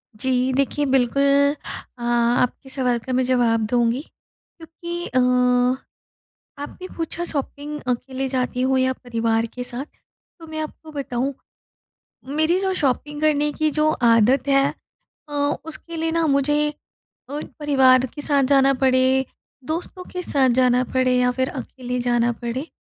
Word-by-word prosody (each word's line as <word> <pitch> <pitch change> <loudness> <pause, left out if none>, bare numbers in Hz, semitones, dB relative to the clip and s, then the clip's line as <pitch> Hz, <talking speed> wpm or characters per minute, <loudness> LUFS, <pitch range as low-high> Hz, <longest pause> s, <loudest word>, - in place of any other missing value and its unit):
जी 255 +3 0
देखिए 275 +2 0
बिल्कुल 280 +2 +3 0.4
अ, - - -13
आपके 240 +2 +1
सवाल 250 -3 0
का 255 +3 -5
मैं 255 +1 +2
जवाब 240 -3 +2
दूँगी, 240 +1 +2
क्योंकि 340 +2 -10
अ, 255 - +1 1.4
आपने 370 +5 -8
पूछा 335 +1 -3
शॉपिंग 295 0 -4
अकेले 260 +2 -2
जाती 255 -1 -1
हो 265 0 +2
या 260 0 +2
परिवार 230 -2 -1
के 250 - -5
साथ। 245 +2 -5 0.6
तो 325 - -10
मैं 315 0 -6
आपको 310 +1 -7
बताऊँ, 270 -1 -2 1.0
मेरी 315 +3 +3
जो 385 -1 0
शॉपिंग 295 0 -1
करने 295 -1 +2
की 310 +1 0
जो 305 +1 +2
आदत 240 +2 +3
है 275 0 +4 0.6
अ, - - -11 0.3
उसके 325 +1 -6
लिए 325 0 -1
ना 330 -1 +1
मुझे 295 +1 +2 0.6
अ, 290 - -3 0.2
परिवार 265 -3 +4
के 290 - -6
साथ 285 -2 +2
जाना 275 0 +4
पड़े, 260 0 +3 0.4
दोस्तों 345 +5 -4
के 360 - -4
साथ 275 -6 +2
जाना 250 0 +4
पड़े 255 -1 +3
या 250 0 +3
फिर 260 +1 -1
अकेले 250 -1 -5
जाना 240 -1 +1
पड़े। 250 +5 -3
265 Hz, 145 wpm, -22 LUFS, 250-295 Hz, 1.4 s, है